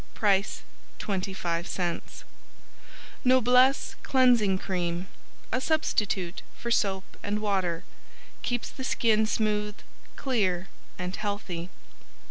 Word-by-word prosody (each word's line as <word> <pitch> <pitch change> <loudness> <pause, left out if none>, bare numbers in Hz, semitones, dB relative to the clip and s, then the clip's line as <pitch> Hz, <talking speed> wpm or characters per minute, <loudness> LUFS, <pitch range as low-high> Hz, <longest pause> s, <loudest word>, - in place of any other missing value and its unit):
Price 200 -1 +2 0.4
25c 185 -3 -2 1.0
Noblesse 255 +1 +5
Cleansing 245 -7 +4
Cream 180 -1 -2 0.4
A 255 - +1
substitute 205 - 0 0.2
for 235 - -4
soap 190 -4 +2 0.2
and 205 +1 -1
water, 190 -5 0 0.6
keeps 245 -1 -2
the 260 - -7
skin 220 -4 +3
smooth, 210 -1 0 0.4
clear 190 -9 0 0.3
and 180 +1 -3
healthy. 200 -5 -3
205 Hz, 90 wpm, -28 LUFS, 185-235 Hz, 1.0 s, Noblesse